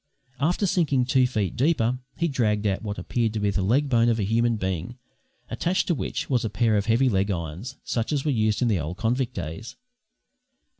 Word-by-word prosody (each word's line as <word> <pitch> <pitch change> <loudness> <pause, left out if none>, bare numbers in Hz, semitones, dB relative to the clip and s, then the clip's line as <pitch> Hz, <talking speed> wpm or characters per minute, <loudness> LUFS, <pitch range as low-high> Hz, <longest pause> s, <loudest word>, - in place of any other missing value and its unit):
After 175 +8 +1
sinking 145 -9 +2
two 130 0 +3
feet 105 -8 -2
deeper 125 -4 +1 0.2
he 170 - +1
dragged 110 -7 0
out 100 -2 0
what 105 -2 -5
appeared 115 -3 -1
to 110 - -2
be 105 -1 +1
the 95 - -1
leg 125 +10 +2
bone 120 -3 +3
of 115 - +2
a - - +1
human 115 +3 +2
being, 95 +3 -3 0.5
attached 185 +3 0
to - - +4
which 150 - -3
was 125 -4 +1
a 110 - -1
pair 110 +1 +1
of 105 +1 0
heavy 120 +4 +3
leg 100 -3 +1
irons, 90 - -4
such 115 +2 -2
as 145 -1 -1
were 150 - +2
used 110 -1 +1
in - - +2
the 105 -6 +2
old 80 +4 -4
convict 120 +3 -1
days. 80 +10 -6
115 Hz, 210 wpm, -25 LUFS, 105-130 Hz, 0.5 s, to